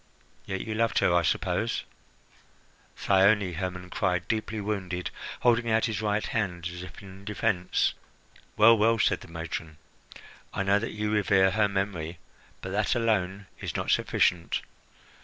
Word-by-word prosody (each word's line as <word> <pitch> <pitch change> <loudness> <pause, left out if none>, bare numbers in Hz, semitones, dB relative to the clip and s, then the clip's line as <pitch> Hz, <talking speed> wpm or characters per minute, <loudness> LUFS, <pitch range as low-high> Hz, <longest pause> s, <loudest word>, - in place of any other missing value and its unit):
Yet 95 -1 -3
you 110 - -4
loved 115 +1 +1
her, 85 - +3
I 85 - +4
suppose?" - - 0 1.1
"Thyone!" 100 -1 +3
Hermon 90 +1 -5
cried, 90 -2 0
deeply 110 -1 -2
wounded, 95 -4 -3 0.3
holding 120 -1 +3
out 110 0 +3
his 110 -2 -2
right 105 0 0
hand 90 -6 -2
as 90 - -7
if 90 +2 -10
in 95 0 -12
defence. 100 -3 0 0.6
"Well, 115 +2 +8
well!" 115 +2 +4
said 105 - +2
the - - -11
matron. 80 -1 -6 0.8
"I 100 - 0
know 100 +1 +3
that 115 - -4
you 105 0 -2
revere 95 -2 +3
her 105 +1 +3
memory. 95 -4 -3 0.4
But 95 - -6
that 105 +2 +1
alone 100 -4 0
is - - -5
not - - -1
sufficient. 85 -2 +1
100 Hz, 150 wpm, -28 LUFS, 90-110 Hz, 1.1 s, Well